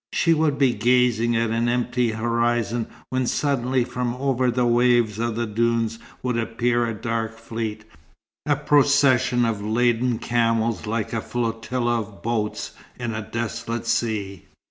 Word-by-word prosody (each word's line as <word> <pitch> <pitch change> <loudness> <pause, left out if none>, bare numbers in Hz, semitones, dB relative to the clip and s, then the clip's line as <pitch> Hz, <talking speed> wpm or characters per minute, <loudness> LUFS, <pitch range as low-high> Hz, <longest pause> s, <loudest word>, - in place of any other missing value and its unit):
She 165 - +3
would 155 -3 +1
be 135 -3 +3
gazing 120 0 +2
at 115 -1 +1
an 115 +1 +1
empty 125 0 0
horizon 115 0 0 0.2
when 130 -1 0
suddenly 130 -3 +1
from 125 0 -3
over 130 -1 +1
the 125 +1 +1
waves 120 -3 +3
of 115 -1 -1
the 120 +1 -1
dunes 115 0 0 0.2
would 125 -2 0
appear 120 +1 0
a 115 - -2
dark 115 0 -3
fleet; 110 -1 -5 0.6
a 145 - +3
procession 140 -4 +3
of 110 -3 -1
laden 120 +2 +1
camels 115 -2 0
like 110 0 -2
a 115 - -1
flotilla 120 +1 -1
of 105 -5 -9
boats 110 -2 -2 0.3
in 120 -2 -3
a 110 - -3
desolate 115 +1 -4
sea. 105 -6 -1
120 Hz, 145 wpm, -23 LUFS, 115-125 Hz, 0.6 s, She